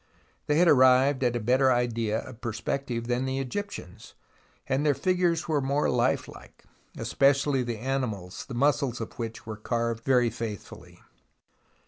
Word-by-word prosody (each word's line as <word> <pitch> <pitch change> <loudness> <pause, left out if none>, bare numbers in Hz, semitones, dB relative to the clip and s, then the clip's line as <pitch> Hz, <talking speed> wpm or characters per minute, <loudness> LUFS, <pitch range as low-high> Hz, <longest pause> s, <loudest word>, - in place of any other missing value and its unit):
They 150 - +2
had 175 +1 +5
arrived 130 0 +5
at 120 -1 +1
a - - 0
better 130 +4 +3
idea 115 -3 0
of 120 -2 -12
perspective 120 +1 -3
than 125 +2 -1
the 130 0 -2
Egyptians, 135 - -6 0.5
and 135 +2 0
their 145 -2 +3
figures 180 -2 +1
were 155 -3 +1
more 140 +2 +1
lifelike, - - -2 0.3
especially 140 0 +2
the 120 -2 -3
animals, 110 -7 -3
the 130 - -6
muscles 135 -2 +1
of 115 - -6
which 115 -1 -5
were 110 -1 -6
carved 115 +1 -2
very 125 -3 +3
faithfully. 110 -3 -8
125 Hz, 145 wpm, -27 LUFS, 115-140 Hz, 0.5 s, had